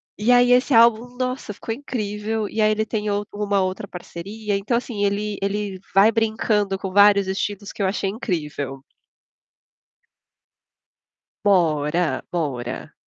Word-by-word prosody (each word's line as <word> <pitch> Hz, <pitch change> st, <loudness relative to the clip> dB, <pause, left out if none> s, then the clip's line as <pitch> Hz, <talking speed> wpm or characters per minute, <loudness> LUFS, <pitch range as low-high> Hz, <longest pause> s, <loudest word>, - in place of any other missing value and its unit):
E 220 Hz, +4 st, +1 dB
aí 245 Hz, 0 st, +5 dB
esse 250 Hz, +1 st, +4 dB
álbum, 235 Hz, +2 st, +4 dB
nossa, 255 Hz, -4 st, -3 dB
ficou 225 Hz, -, -5 dB
incrível, 220 Hz, -4 st, -3 dB
e 220 Hz, -, -2 dB
aí 215 Hz, -, +4 dB
ele 215 Hz, 0 st, 0 dB
tem 215 Hz, -1 st, -2 dB
um 205 Hz, 0 st, 0 dB, 0.4 s
outra 185 Hz, +2 st, -3 dB
parceria 200 Hz, +4 st, -5 dB
então 210 Hz, +5 st, 0 dB
assim 230 Hz, -4 st, -3 dB
ele 205 Hz, +1 st, -1 dB
ele 200 Hz, -1 st, -2 dB
vai 200 Hz, +3 st, +6 dB
brincando 220 Hz, -3 st, 0 dB
com 190 Hz, 0 st, -5 dB
vários 200 Hz, 0 st, +6 dB
estilos 200 Hz, +1 st, -3 dB
que -, -, -6 dB
eu 190 Hz, -, +2 dB
achei 195 Hz, 0 st, -1 dB
incrível. 150 Hz, -, -4 dB, 2.6 s
Mora, 160 Hz, -5 st, +2 dB
mora. 135 Hz, -8 st, -4 dB
205 Hz, 135 wpm, -22 LUFS, 190-220 Hz, 2.6 s, vai